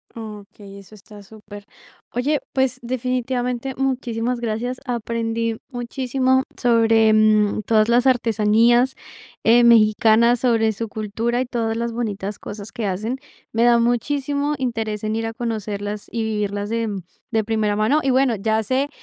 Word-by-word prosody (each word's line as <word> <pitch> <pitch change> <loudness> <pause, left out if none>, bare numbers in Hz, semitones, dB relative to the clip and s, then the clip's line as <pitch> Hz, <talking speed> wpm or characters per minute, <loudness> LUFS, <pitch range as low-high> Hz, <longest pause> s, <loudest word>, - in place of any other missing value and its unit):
Okey, 205 -2 -10
eso 200 +1 -15
está 205 0 -14
super. 205 0 -12 0.5
Oye, 280 +4 0
pues, 265 -2 +1
definitivamente, 250 +1 -2
muchísimas 250 -2 -2
gracias. 240 +2 -3
Aprendí 230 -1 -2
muchísimo 260 +1 0
sobre, 225 -2 +3
mm, 215 -1 +3
todas 215 -1 +3
las 240 +2 +3
artesanías, 235 +1 +3 0.5
eh, 235 +2 +5
mexicanas, 230 +1 +5
sobre 225 -3 +2
su 225 +2 -5
cultura, 220 +3 -2
y - - -1
todas 230 -2 -2
las 235 0 -2
bonitas 210 -4 -4
cosas 205 0 -8
que 225 - -4
hacen. 215 +7 -2 0.4
Me 230 +1 +2
da 240 -1 +5
muchísimo 280 +5 0
interés 225 -4 -3
en 215 0 -1
ir 225 0 -2
a 225 - -4
conocerlas 210 -3 -4
y 230 -1 -2
vivirlas 205 -2 -2
de, 230 0 -1
mm, 200 -2 -4 0.3
de 220 -1 +1
primera 215 -1 0
mano. 215 +9 +2
Y 270 - +2
bueno, 260 -2 +3
ya 220 +2 0
sé 260 +6 0
230 Hz, 150 wpm, -21 LUFS, 215-245 Hz, 0.5 s, eh